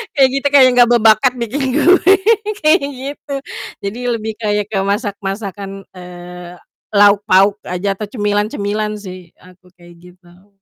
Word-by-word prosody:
Kayak 265 Hz, -2 st, +4 dB
gitu, 285 Hz, -, -1 dB
kayak 260 Hz, -2 st, +7 dB
nggak 240 Hz, -1 st, +6 dB
berbakat 225 Hz, +3 st, +4 dB
bikin 245 Hz, +4 st, -3 dB
kue 360 Hz, +4 st, +4 dB, 0.5 s
kayak 310 Hz, +1 st, +4 dB, 0.2 s
gitu, 280 Hz, +1 st, -7 dB, 0.5 s
jadi 205 Hz, +5 st, -5 dB, 0.2 s
lebih 220 Hz, 0 st, -5 dB
kayak 210 Hz, -2 st, -1 dB
ke 195 Hz, -, -1 dB
masak-masakan, 200 Hz, -1 st, -4 dB
eee, 180 Hz, -1 st, -11 dB, 0.4 s
lauk 205 Hz, 0 st, +5 dB
pauk 195 Hz, +2 st, +3 dB
aja 185 Hz, +2 st, -2 dB
atau 215 Hz, -, -5 dB
cemilan-cemilan 210 Hz, 0 st, -2 dB
sih 185 Hz, -4 st, -11 dB
aku 180 Hz, 0 st, -21 dB
kayak 175 Hz, -1 st, -17 dB
gitu 180 Hz, +2 st, -20 dB
205 Hz, 135 wpm, -16 LUFS, 185-230 Hz, 0.5 s, kayak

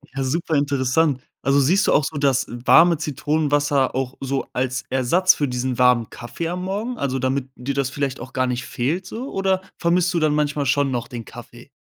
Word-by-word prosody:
Ja, 135 Hz, -, -1 dB
super 160 Hz, +4 st, -1 dB
interessant. 140 Hz, 0 st, +1 dB, 0.2 s
Also, 140 Hz, +1 st, +3 dB
siehst 175 Hz, +9 st, +3 dB
du -, -, +3 dB
auch 150 Hz, -, +4 dB
so 150 Hz, -, -4 dB
das 135 Hz, -2 st, +1 dB
warme 160 Hz, +8 st, +4 dB
Zitronenwasser 145 Hz, -2 st, 0 dB
auch 130 Hz, 0 st, -2 dB
so 135 Hz, 0 st, -3 dB
als 130 Hz, 0 st, -2 dB
Ersatz 170 Hz, +9 st, +3 dB
für 145 Hz, -, -1 dB
diesen 125 Hz, 0 st, -2 dB
warmen 125 Hz, -3 st, +3 dB
Kaffee 140 Hz, +7 st, -6 dB
am 180 Hz, +1 st, -4 dB
Morgen? 210 Hz, +6 st, -3 dB
Also, 135 Hz, -5 st, -2 dB
damit 130 Hz, +1 st, -1 dB
dir 135 Hz, +2 st, -4 dB
das 140 Hz, -2 st, 0 dB
vielleicht 135 Hz, -1 st, -3 dB
auch 125 Hz, +2 st, -9 dB
gar 130 Hz, -1 st, +1 dB
nicht 125 Hz, 0 st, -3 dB
fehlt 155 Hz, +10 st, -2 dB
so 250 Hz, +8 st, -6 dB
oder 190 Hz, -1 st, 0 dB, 0.2 s
vermisst 175 Hz, +2 st, +1 dB
du 170 Hz, -, +1 dB
dann 155 Hz, -2 st, +2 dB
manchmal 150 Hz, -1 st, 0 dB
schon 140 Hz, +2 st, +2 dB
noch 120 Hz, -2 st, -3 dB
den 120 Hz, -2 st, -7 dB
Kaffee? 120 Hz, +1 st, -12 dB
140 Hz, 205 wpm, -22 LUFS, 130-160 Hz, 0.2 s, auch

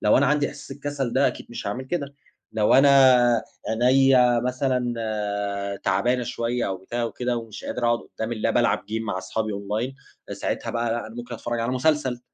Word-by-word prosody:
لو 105 Hz, -, +5 dB
أنا 140 Hz, -, +4 dB
عندي 145 Hz, +1 st, +2 dB
إحساس 145 Hz, +1 st, -11 dB
الكسَل 140 Hz, -3 st, -3 dB
ده، 135 Hz, +1 st, +3 dB
أكيد -, -, -3 dB
مش 120 Hz, -, -6 dB
هاعمل 120 Hz, +6 st, -3 dB
كده. 140 Hz, -2 st, -4 dB, 0.4 s
لو 105 Hz, -1 st, +3 dB
أنا 130 Hz, -4 st, +6 dB, 0.4 s
عينيّا 125 Hz, -2 st, +5 dB
مثلًا 125 Hz, -1 st, 0 dB, 0.9 s
تعبانة 120 Hz, +7 st, +1 dB
شوية 120 Hz, 0 st, -2 dB
أو 95 Hz, -, -2 dB
بتاع 120 Hz, +6 st, -4 dB
وكده، 125 Hz, +1 st, -2 dB
ومش 115 Hz, -3 st, -7 dB
قادِر 125 Hz, -, -3 dB
أقعُد 120 Hz, 0 st, +3 dB
قُدَّام 110 Hz, 0 st, -6 dB
اللاب، 110 Hz, -, 0 dB
ألعب -, -, +3 dB
game 110 Hz, +2 st, -4 dB
مع 100 Hz, -4 st, -3 dB
أصحابي 105 Hz, +3 st, -3 dB
online، 105 Hz, +6 st, -3 dB, 0.4 s
فساعتها -, -, -3 dB
بقى، 115 Hz, 0 st, -1 dB
لا، 120 Hz, 0 st, -2 dB
أنا 110 Hz, -, -11 dB
ممكن 120 Hz, 0 st, -7 dB
أتفرَّج 120 Hz, +1 st, -3 dB
على 115 Hz, +2 st, -1 dB
مسلسل. 130 Hz, -2 st, +1 dB
120 Hz, 180 wpm, -24 LUFS, 115-130 Hz, 0.9 s, أنا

